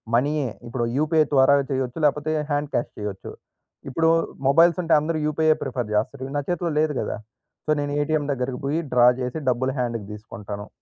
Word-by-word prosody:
మనీయే 140 +1 +1 0.2
ఇప్పుడు 120 0 -2
యూపీఐ 155 +1 +3
ద్వారా 135 0 +6 0.2
చేయొచ్చు. 130 +1 -2
లేపోతే 150 +2 +1 0.2
హాండ్ 145 0 -1
క్యాష్ 120 - -1
చేయొచ్చు. 105 -2 -6 0.6
ఇప్పుడు 160 +4 +2 0.4
మొబైల్స్ 165 +5 +5
ఉంటే 165 - +2
అందరూ 155 +2 -2
యూపీఐ 155 +1 +3
ప్రిఫర్ 125 -5 -3
జేస్తారు. 130 +5 -1
నా - - +2
చేతిలో 175 -1 -1
లేదు 155 -1 +2
గదా! - - -3 0.5
సో 155 - +2
నేను 145 0 -2
ఏటీఎం 150 0 0
దగ్గరకి 125 -1 -2
పోయి 150 +4 0
డ్రా 120 -1 +6
జేసి 125 +5 -3
డబ్బులు 130 +2 0
హాండ్‌కి 115 -4 -2
దీసుకుంటాను. 105 -1 -8
140 Hz, 165 wpm, -24 LUFS, 125-155 Hz, 0.6 s, ద్వారా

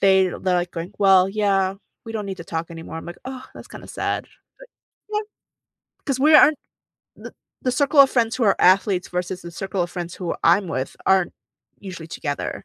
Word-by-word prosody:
they're 190 -2 +3
they're, 185 -1 0
like, 175 0 -1
going, 170 +3 -6
"Well, 190 -2 +5
yeah, 195 -2 +1 0.3
we 225 - -7
don't 210 -2 -4
need 190 -1 -6
to 170 - -8
talk 165 0 -4
anymore." 165 -1 -8
I'm 165 - -8
like, 175 - -9
"Ugh, 260 0 -7
that's - - -12
kinda - - -11
sad.” - - -2 0.3
But - - -14 0.4
no. 420 0 0 0.9
'Cause 270 -3 -1
we 305 +3 +5
aren't 300 -2 +7 1.1
the 255 - 0
circle 285 +3 +1
of 275 -1 +7
friends 230 -2 +1
who 240 - 0
are 200 - +4
athletes 185 0 +3
versus 180 +1 -4
the 170 - -8
circle 190 +1 -3
of 175 - -4
friends 175 -1 -6
who 180 -3 -3
I'm 180 +2 +4
with 130 -4 -3
aren't 190 -2 +3 0.5
usually 185 -5 -8
together. 145 -3 -4
190 Hz, 195 wpm, -22 LUFS, 175-220 Hz, 1.1 s, aren't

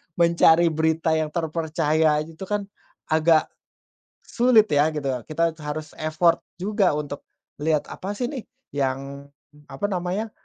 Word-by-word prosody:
mencari 170 0 +5
berita 160 +1 +1
yang 155 -1 0
terpercaya 160 -2 +1
aja 155 - -8
itu 175 +4 -8
kan 205 +1 -1 0.5
agak 160 0 +3 0.8
sulit, 235 -3 +4
ya, 145 +2 +4
gitu. 145 -2 -2 0.2
Kita 165 +1 +1
harus 150 +1 -5
effort 155 +2 +2 0.2
juga 205 0 +2
untuk 145 -1 -5 0.4
lihat 150 0 0
apa, 200 +2 -5
sih, 245 +4 -3
nih, 265 -6 -7 0.2
yang 140 0 -3 0.4
apa 135 +9 -3
namanya, 190 +4 -2
160 Hz, 130 wpm, -24 LUFS, 150-180 Hz, 0.8 s, mencari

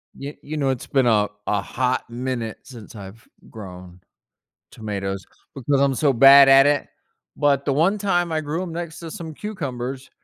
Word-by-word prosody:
Ye 140 +2 -8
you 155 +1 -6
know, 140 -2 0
it's 130 -2 -3
been 135 -3 +2
a 105 -3 +3 0.2
a 105 -1 0
hot 130 +4 -2
minute 120 -2 -4
since 115 -4 -13
I've 105 +2 -12 0.2
grown 90 -4 -11 0.7
tomatoes 100 -3 -5 0.3
because 135 +1 0
I'm 140 -1 +2
so 140 +1 +2
bad 135 +3 +8
at 135 0 +7
it. 145 -1 +1 0.5
But 140 -2 +2
the 140 - +1
one 170 +9 +2
time 175 -4 0
I 160 -1 -1
grew 155 +3 -3
'em 180 - -6
next 170 -1 -6
to 165 -2 -8
some 165 -5 -8
cucumbers, 135 - -6
135 Hz, 175 wpm, -22 LUFS, 115-155 Hz, 0.7 s, bad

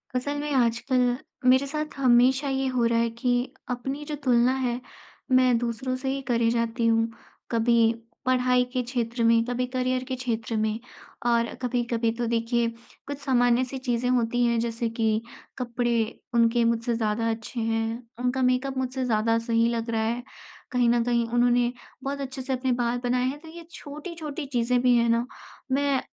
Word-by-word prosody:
असल 285 +3 -1
में 295 0 -3
आजकल, 245 0 +2 0.3
मेरे 260 +2 +5
साथ 305 +1 -4
हमेशा 260 +2 +4
ये 270 0 0
हो 240 -2 +2
रहा 230 0 +2
है 230 0 +2
कि 235 +2 -1 0.4
अपनी 270 +4 -3
जो 300 0 -4
तुलना 245 -1 +4
है, 250 -2 -1 0.5
मैं 255 -1 +5
दूसरों 240 +2 -2
से 260 +1 -3
ही 275 +1 -2
करे 235 -2 +2
जाती 230 0 0
हूँ। 225 0 +3 0.4
कभी 230 0 +3 0.3
पढ़ाई 250 -1 +3
के 255 - +1
क्षेत्र 235 -1 -2
में, 230 0 +5
कभी 250 +1 -1
करियर 255 0 0
के 260 0 -4
क्षेत्र 230 -3 -3
में 215 0 0 0.5
और 235 -1 +2
कभी-कभी 240 -2 0
तो 235 +1 -3
देखिए 235 +1 +1 0.4
कुछ 285 0 -4
सामान्य-सी 250 -1 +2
चीजें 250 -1 -1
होती 245 -1 +2
हैं 235 -1 +2
जैसे 230 0 -2
कि 225 -1 0 0.4
कपड़े 240 -1 -1 0.4
उनके 235 0 +3
मुझसे 230 +1 +1
ज़्यादा 225 0 0
अच्छे 225 +2 -4
हैं, 225 +1 -1 0.2
उनका 250 +1 0
मेकअप 255 +1 +1
मुझसे 260 0 -2
ज़्यादा 225 -1 +2
सही 230 0 +2
लग 230 0 -2
रहा 225 -1 0
है, 235 +2 -1 0.5
कहीं 245 -2 +3
न 235 0 +3
कहीं 235 -1 +1
उन्होंने 245 0 +3 0.3
बहुत 280 +1 -3
अच्छे-से 265 0 -4
अपने 255 0 0
बाल 240 0 0
बनाए 250 +1 +1
हैं 280 +3 -3
तो 320 - -14
ये 340 +1 -10
छोटी-छोटी 305 0 -7
चीजें 250 -2 +1
भी 250 -1 +4
है 235 0 +3
ना, 230 +1 +2 0.5
मैं 275 0 +2
245 Hz, 170 wpm, -26 LUFS, 230-255 Hz, 0.5 s, मेरे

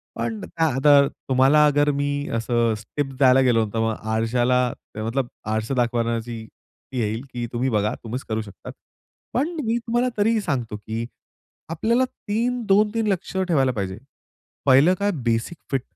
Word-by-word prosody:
पण 115 -1 -3
त्या 165 -1 -1
आता 140 +1 +6
तुम्हाला 135 +3 +3
अगर 145 0 +3
मी 145 0 -2
असं 115 0 +1
अ, - - +1 0.2
टीप्स 135 -2 -1
द्यायला 130 -1 +5
गेलो, 120 -4 +3
तर 115 - -1
मग 115 -1 0 0.2
आरश्याला 120 +3 +2 0.4
मतलब 115 +4 -1 0.3
आरसा 110 +4 -1
दाखवण्याची 115 -2 -1 0.5
ती 130 - -3
येईल 110 +1 -1
की 120 -1 -3
तुम्ही 125 +2 0
बघा, 105 0 +1
तुम्हीच 120 +3 -5
करू 110 0 -1
शकता. 100 -4 -11 0.6
पण 285 +7 +1 0.2
मी 225 +1 +1
तुम्हाला 240 +2 0
तरीही 220 +2 +2
सांगतो, 130 - -2
की 110 +3 -5 0.6
आपल्याला 230 +10 +1
3, 245 +1 -2
2-3 210 +2 +2
लक्ष 190 -1 -2
ठेवायला 155 -9 +2
पाहिजे. 100 -4 -4 0.7
पहिलं 140 +7 +6
काय, 205 0 +1
बेसिक 115 +8 -1
फिट 135 -2 +1
130 Hz, 155 wpm, -23 LUFS, 115-170 Hz, 0.7 s, आता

